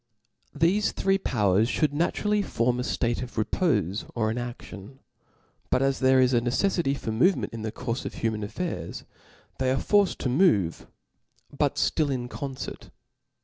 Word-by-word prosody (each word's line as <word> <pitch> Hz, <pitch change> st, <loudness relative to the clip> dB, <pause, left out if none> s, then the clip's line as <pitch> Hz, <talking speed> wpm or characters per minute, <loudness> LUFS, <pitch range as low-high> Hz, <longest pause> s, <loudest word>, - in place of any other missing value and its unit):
Thefc 180 Hz, +7 st, +2 dB
three.powers 115 Hz, -, +2 dB
fhould 150 Hz, +1 st, +1 dB
naturally 205 Hz, +7 st, 0 dB
form 125 Hz, -, 0 dB
a -, -, 0 dB
ftatc 120 Hz, -1 st, -1 dB
of 125 Hz, -1 st, -7 dB
repofe 110 Hz, -, 0 dB
or 110 Hz, -2 st, 0 dB
inadion. 120 Hz, -1 st, -7 dB, 0.7 s
But 130 Hz, -, +2 dB
as 135 Hz, 0 st, +1 dB
there 130 Hz, 0 st, +4 dB
is 130 Hz, 0 st, +4 dB
a 120 Hz, -, +3 dB
ncccffity 140 Hz, +3 st, +1 dB
for 110 Hz, -, -4 dB
movement 135 Hz, -, +2 dB
in 115 Hz, -, -5 dB
the 110 Hz, 0 st, -3 dB
courfe 125 Hz, +1 st, -4 dB
of -, -, -5 dB
human 110 Hz, -2 st, -2 dB
affairs, 170 Hz, -, -5 dB, 0.6 s
they 130 Hz, -1 st, +1 dB
are 130 Hz, -, +2 dB
forced 205 Hz, +5 st, +2 dB
to -, -, -1 dB
move, 125 Hz, -, +2 dB, 0.7 s
but -, -, +1 dB
ftill 155 Hz, -2 st, +1 dB
in 125 Hz, -2 st, -3 dB
concert. 135 Hz, -1 st, -6 dB
130 Hz, 150 wpm, -26 LUFS, 115-155 Hz, 0.7 s, there